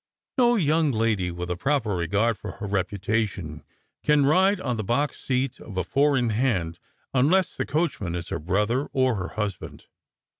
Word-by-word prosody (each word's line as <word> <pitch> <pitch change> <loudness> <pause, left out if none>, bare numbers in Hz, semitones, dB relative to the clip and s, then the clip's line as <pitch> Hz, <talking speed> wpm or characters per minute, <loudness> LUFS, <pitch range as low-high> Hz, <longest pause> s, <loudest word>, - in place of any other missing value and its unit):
" - - -64
No 240 -1 +5
young 160 -5 +2
lady, 110 -6 +1
with 90 +1 -5
a - - 0
proper 130 +2 0
regai'd 100 +7 +1
for 100 -1 -8
her 105 - -7
reputation, 100 -4 -2 0.4
can 150 -2 +4
ride 190 +7 +4
on 125 -9 -2
the 110 - -2
box 140 +7 -1
seat 130 -1 -1
of 100 -4 -9
a 95 - +1
four 140 - +2
in 120 -2 +1
hand, 100 -8 0 0.3
unless 160 +8 +3
the - - -3
coach 160 -1 0
man 85 -3 -3
is 85 0 -5
her 85 - -3
brother 105 - 0
or 130 -1 +3
her 90 0 -3
husband." 105 -3 -4
115 Hz, 185 wpm, -25 LUFS, 95-140 Hz, 0.4 s, No